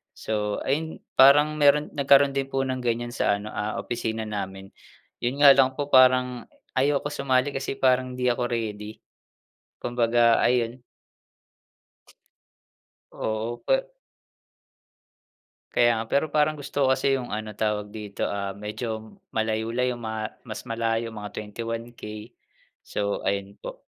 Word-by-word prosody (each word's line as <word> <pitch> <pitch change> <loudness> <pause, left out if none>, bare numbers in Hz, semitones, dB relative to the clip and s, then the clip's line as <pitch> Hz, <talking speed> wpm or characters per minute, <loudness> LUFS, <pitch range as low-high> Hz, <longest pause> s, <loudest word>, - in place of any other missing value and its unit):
So, 105 -1 -2
ayun, 160 +4 -2 0.2
parang 145 +3 +6
meron 145 +1 +4
nagkaroon 140 0 +5
din 135 0 -2
po 135 0 -1
ng 130 -1 -2
ganyan 120 0 -2
sa 105 -3 +1
ano, 105 +1 -7
ah, 105 +1 -3
opisina 115 -2 -3
namin. 95 -2 -6 0.5
Yun 135 +4 -1
nga 140 - +11
lang 130 -1 +4
po 145 0 -4
parang 125 -1 +4 0.2
ayoko 140 +2 +1
sumali 135 -1 +1
kasi 135 0 -3
parang 130 -1 +2
hindi 125 -1 +1
ako 120 0 -1
ready. 110 -2 -4 0.9
Kumbaga, 120 -1 +3
ayun. 120 0 +1 2.3
Oo, 110 +2 -3
pe - - 0 1.8
Kaya 120 0 +5
nga, 115 - -2
pero 140 +6 0
parang 150 0 +2
gusto 140 -1 -1
kasi 135 +1 +2
yung 120 -4 -5
ano, 110 0 -4
tawag 105 -1 -2
dito, 105 -2 -7
ah, 100 -1 -3
medyo 110 +2 -6 0.2
malayo-layo 115 +3 -1
ma 110 -1 -4 0.2
mas 110 - -6
malayo, 115 0 -1
mga 105 -2 -8
21K. 115 0 -6 0.6
So, 100 0 -2
ayun 100 +1 -2
po. - - -9
120 Hz, 130 wpm, -25 LUFS, 110-135 Hz, 2.3 s, nga